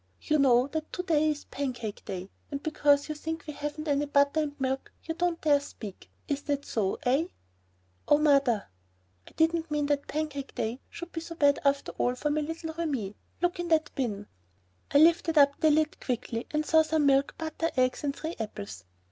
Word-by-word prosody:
You 305 -1 +1
know 250 -2 +5
that 315 +1 -4
to 360 - -2
day 310 -3 +3
is 295 -1 -2
Pancake 245 -6 -4
day, 190 +1 -6 0.2
and 280 -1 -5
because 290 -2 +3
you 305 - -2
think 320 +2 -5
we 300 - -6
haven't 295 +2 -5
any 290 0 +1
butter 285 +2 +3
and 290 -2 -4
milk 265 0 -2
you 325 - -3
don't 340 0 0
dare 290 -2 +4
speak. 215 -8 -10 0.2
Isn't 285 0 -3
that 285 -1 -1
so, 200 -4 -1
eh? 275 +7 +2 0.8
"Oh, 295 - +6
Mother." 275 -8 +3 0.6
"I - - -13
didn't 325 0 +1
mean 295 -1 0
that 285 -1 0
Pancake 295 -3 -4
day 230 +4 -2
should 345 0 -8
be 325 - -4
so 335 0 -8
bad 285 -3 +4
after 280 0 +1
all 245 0 +2
for 295 +4 -1
my 305 +1 +1
little 320 +1 -4
Remi. 275 -12 -2 0.3
Look 350 +1 +1
in 350 - -2
that 315 -2 +2
bin." 210 -7 -2 0.6
I 285 - +4
lifted 325 +1 +5
up 280 -1 +5
the 315 - +4
lid 305 0 +2
quickly 235 -2 -3
and 305 0 -1
saw 320 0 +5
some 310 -1 +1
milk, 275 0 +3
butter, 325 +1 -2
eggs, 255 +2 +2
and 280 -1 -1
three 320 +3 -5
apples. 100 - -6
290 Hz, 200 wpm, -29 LUFS, 270-315 Hz, 0.8 s, Oh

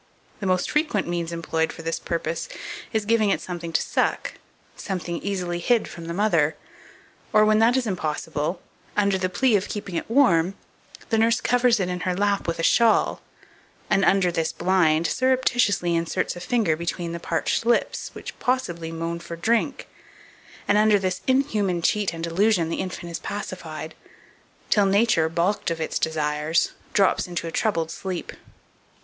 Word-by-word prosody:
The 200 - -3
most 185 -1 +1
frequent 300 - +1
means 170 -1 -2
employed 165 -1 -1
for 165 - -10
this 165 0 -2
purpose 165 -1 -3 0.4
is 220 -2 -1
giving 220 -1 +3
it - - +1
something 170 -2 -6
to - - +1
suck, - - -1 0.4
something 175 -3 -4
easily 180 -3 -2
hid 235 +5 +2
from 170 - -9
the 170 - -3
mother, 170 -7 +2 0.8
or, 215 0 +5
when 215 0 +4
that 235 +3 +4
is 260 - 0
impossible, 160 -3 -2 0.4
under 200 -2 +2
the 185 0 0
plea 235 +5 +2
of 200 -1 0
keeping 205 -3 -5
it 170 - -3
warm, 195 -8 +3 0.6
the 225 - +3
nurse 230 +2 +3
covers 245 -2 +3
it 185 - 0
in 180 0 -3
her 180 0 -1
lap 200 0 0
with 170 0 -1
a 165 - -3
shawl, 230 +5 +3 0.7
and, 195 - +4
under 190 -2 +3
this 165 -1 -1
blind, 170 -4 +2
surreptitiously 245 -8 +2
inserts 165 +1 -1
a - - -7
finger 200 -3 +1
between 170 +1 -3
the 170 - -5
parched 165 +4 -1
lips, 235 +1 0
which - - -9
possibly 175 -11 -1
moan 165 +1 -3
for 170 0 -7
drink; 235 - 0 0.8
and, 205 +1 +4
under 215 -1 +5
this 185 -2 -2
inhuman 220 -9 +1
cheat 200 +4 +1
and 165 0 -7
delusion, 170 0 +2
the - - -2
infant 175 -2 -6
is 165 - -4
pacified, 160 -6 -6 0.8
till 205 -2 +4
Nature, 195 -5 +3
balked 175 +5 0
of 165 -1 -3
its 160 - -2
desires, 155 +1 0 0.2
drops 195 -2 +2
into 175 -1 -4
a 165 - -4
troubled 165 -8 0
sleep. 185 0 -5
180 Hz, 165 wpm, -24 LUFS, 165-215 Hz, 0.8 s, or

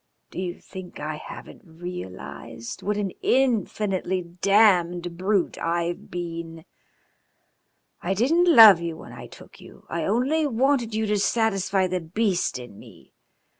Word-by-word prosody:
Do - - -6
you 180 -1 -4
think 185 -2 -10
I 150 +1 -4
haven't - - -11
realised 165 - -8
what 205 +1 -1
an 200 -3 -2
infinitely 205 -7 0
damned 175 -1 +2
brute 190 +1 0
I've 170 +1 -2
been? 165 -2 -6 1.4
I 190 +3 -1
didn't 330 - +3
love 220 - +9
you 165 -1 -4
when 120 - -12
I 120 0 -10
took - - -15
you, - - -15
I 165 -1 -2
only 270 +9 +1
wanted 250 -2 +1
you 220 0 0
to 210 -1 0
satisfy 195 -3 +1
the 185 0 -2
beast 180 - -1
in 120 -5 -11
me. - - -17
185 Hz, 135 wpm, -24 LUFS, 170-215 Hz, 1.4 s, love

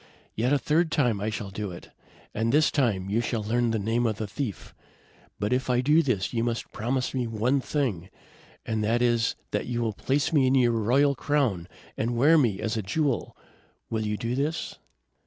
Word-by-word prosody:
Yet 120 +4 0
a 145 - +4
third 160 +4 +1
time 120 -10 +1
I 105 - -1
shall 105 -3 -5
do 105 +1 -4
it, 85 - -10 0.4
and 115 +2 0
this 150 +3 +4
time 110 -10 +1
you 115 +3 +2
shall 115 -2 -2
learn 120 +3 +1
the 115 - 0
name 115 +3 0
of 110 - -1
the 110 - -3
thief. 105 - -5 0.6
But 105 +4 -1
if 130 +1 -1
I 125 0 +3
do 150 +5 +4
this, 125 - -1
you 115 -1 0
must 115 -1 -3
promise 125 +4 -2
me 125 -3 -1
one 120 +5 +1
thing, 115 - -2 0.6
and 110 -1 -1
that 115 +3 +1
is 120 -2 +2 0.2
that - - -2
you 120 -1 -2
will 110 -2 -1
place 145 - 0
me 140 -4 +4
in 130 - +3
your 125 -3 +4
royal 125 +6 +3
crown 130 - 0 0.3
and 115 +2 -1
wear 150 +7 +5
me 115 -11 +2
as 110 0 -1
a 110 - -1
jewel. 135 +6 -1 0.5
Will 110 -1 -1
you 105 0 -2
do 115 +2 -3
this?" 145 +5 -2
120 Hz, 205 wpm, -26 LUFS, 110-135 Hz, 0.6 s, wear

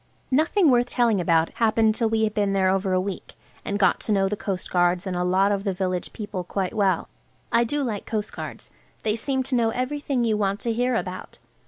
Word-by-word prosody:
Nothing 315 +4 +3
worth 245 0 +3
telling 230 -6 +2
about 165 -1 +2
happened 220 -1 +2
till 225 0 +1
we 220 0 +1
had 215 -1 0
been 205 -2 +1
there 190 -1 +3
over 190 0 0
a 185 - +3
week, 190 0 -5 0.3
and - - -4
had - - -1
got 195 - +3
to - - -3
know 195 -2 +3
the 210 - -1
coastguards 180 -2 0
and 185 -2 -3
a 180 - 0
lot 190 +3 +3
of 200 -1 -1
the 195 -2 -1
village 185 -1 -2
people 205 -4 -5
quite 185 +1 -3
well. 200 -3 +1 0.4
I 235 - +4
do 285 +5 -1
like 215 -6 -4
coastguards. 215 -1 -5 0.3
They 215 -1 +1
seem 265 +3 -1
to 255 0 -1
know 230 -2 +3
everything 260 +1 -1
you 220 -2 +1
want 200 -1 0
to 235 - -1
hear 245 +2 +1
about. 185 -3 -5
210 Hz, 220 wpm, -24 LUFS, 190-235 Hz, 0.4 s, I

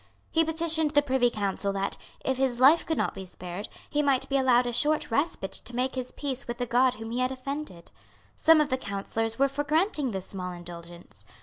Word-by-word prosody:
He 325 - +4
petitioned 320 -1 +1
the 290 - +6
Privy 260 -3 +2
Council 200 -2 -1
that, 195 0 -2 0.3
if 265 -1 0
his 260 -2 0
life 285 +6 +6
could 320 - 0
not - - 0
be 195 - -7
spared, 180 +2 -7 0.2
he 295 - 0
might 275 -3 +2
be 275 - 0
allowed 250 -2 +4
a 240 - -2
short 300 +1 +1
respite 255 - 0
to 245 - -3
make 255 +1 0
his 255 -1 -2
peace 275 -2 -4
with 240 0 -4
the 245 - -1
God 250 +2 +3
whom 225 0 -7
he 245 - -2
had 255 +1 +1
offended. 265 - -6 0.4
Some 320 0 +6
of 300 -1 +2
the 260 -1 0
Councillors 225 +2 -3
were 275 - +4
for 275 +2 -3
granting 305 -2 +1
this 190 -4 -4
small 180 -2 -5
indulgence. 175 0 -9
255 Hz, 215 wpm, -27 LUFS, 205-290 Hz, 0.4 s, the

